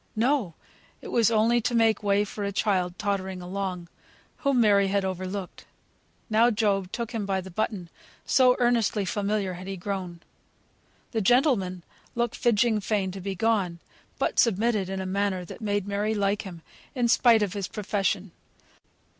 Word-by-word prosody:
No! 230 Hz, -, +1 dB, 0.4 s
it -, -, -10 dB
was 230 Hz, -3 st, +3 dB
only 230 Hz, +2 st, +3 dB
to 240 Hz, -, -1 dB
make 225 Hz, -2 st, +3 dB
way 200 Hz, 0 st, +2 dB
for 205 Hz, 0 st, -6 dB
a 200 Hz, -, -1 dB
child, 185 Hz, -3 st, 0 dB
tottering 190 Hz, -2 st, -2 dB
along, 180 Hz, -1 st, -4 dB, 0.5 s
whom 275 Hz, -3 st, +1 dB
Mary 200 Hz, -3 st, +4 dB
had 195 Hz, 0 st, 0 dB
overlooked. 185 Hz, 0 st, -5 dB, 0.6 s
Now 225 Hz, +2 st, +4 dB
Job 200 Hz, -4 st, 0 dB
took 235 Hz, -1 st, -4 dB
him 225 Hz, -3 st, -3 dB
by 190 Hz, -1 st, 0 dB
the 190 Hz, 0 st, -8 dB
button, 195 Hz, -1 st, -2 dB, 0.4 s
so 255 Hz, -1 st, +4 dB
earnestly 230 Hz, -4 st, +1 dB
familiar 200 Hz, -1 st, -1 dB
had 180 Hz, +2 st, -9 dB
he 195 Hz, 0 st, -4 dB
grown. 180 Hz, -2 st, -5 dB, 0.9 s
The 225 Hz, -, -1 dB
gentleman 195 Hz, -, +2 dB, 0.3 s
looked 240 Hz, -1 st, 0 dB
"fidging 230 Hz, -1 st, +2 dB
fain" 195 Hz, -2 st, -1 dB
to 190 Hz, +1 st, -8 dB
be 195 Hz, +1 st, -4 dB
gone, 195 Hz, -4 st, 0 dB, 0.4 s
but -, -, 0 dB
submitted 215 Hz, -3 st, +2 dB
in 195 Hz, 0 st, -3 dB
a -, -, -4 dB
manner 190 Hz, -1 st, -1 dB
that 175 Hz, -, -10 dB
made 205 Hz, -2 st, -1 dB
Mary 205 Hz, +2 st, -1 dB
like 205 Hz, 0 st, 0 dB
him 175 Hz, -5 st, -10 dB, 0.3 s
in 245 Hz, -2 st, +1 dB
spite 230 Hz, -2 st, +5 dB
of 200 Hz, -2 st, -2 dB
his 200 Hz, -3 st, -3 dB
profession. 200 Hz, -1 st, -2 dB
200 Hz, 165 wpm, -26 LUFS, 190-225 Hz, 0.9 s, spite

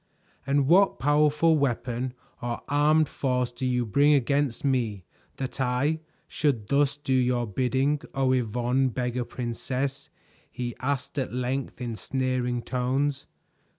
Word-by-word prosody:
"And 140 Hz, 0 st, +3 dB
what 190 Hz, +5 st, +5 dB
powerful 150 Hz, +2 st, +3 dB
weapon 125 Hz, -1 st, -1 dB, 0.3 s
or 120 Hz, 0 st, -3 dB
armed 150 Hz, +2 st, +3 dB
force 125 Hz, -3 st, -1 dB
do 125 Hz, +2 st, -3 dB
you 125 Hz, -1 st, +1 dB
bring 145 Hz, +7 st, +4 dB
against 140 Hz, 0 st, 0 dB
me 115 Hz, -9 st, 0 dB, 0.3 s
that 130 Hz, 0 st, -4 dB
I 130 Hz, +5 st, +1 dB, 0.3 s
should 120 Hz, -9 st, -1 dB
thus 140 Hz, 0 st, +2 dB
do 145 Hz, -2 st, -2 dB
your 125 Hz, -1 st, +2 dB
bidding, 130 Hz, +6 st, 0 dB
O 135 Hz, -1 st, +2 dB
Yvonne, 125 Hz, +2 st, +1 dB
Beggar 125 Hz, 0 st, -2 dB
Princess?" 130 Hz, +4 st, -3 dB, 0.4 s
he 120 Hz, -1 st, -4 dB
asked 140 Hz, +2 st, -2 dB
at 130 Hz, -, -2 dB
length 125 Hz, +2 st, -3 dB
in 120 Hz, -2 st, -3 dB
sneering 125 Hz, -1 st, -1 dB
tones. 135 Hz, +3 st, -1 dB
130 Hz, 130 wpm, -26 LUFS, 125-140 Hz, 0.4 s, what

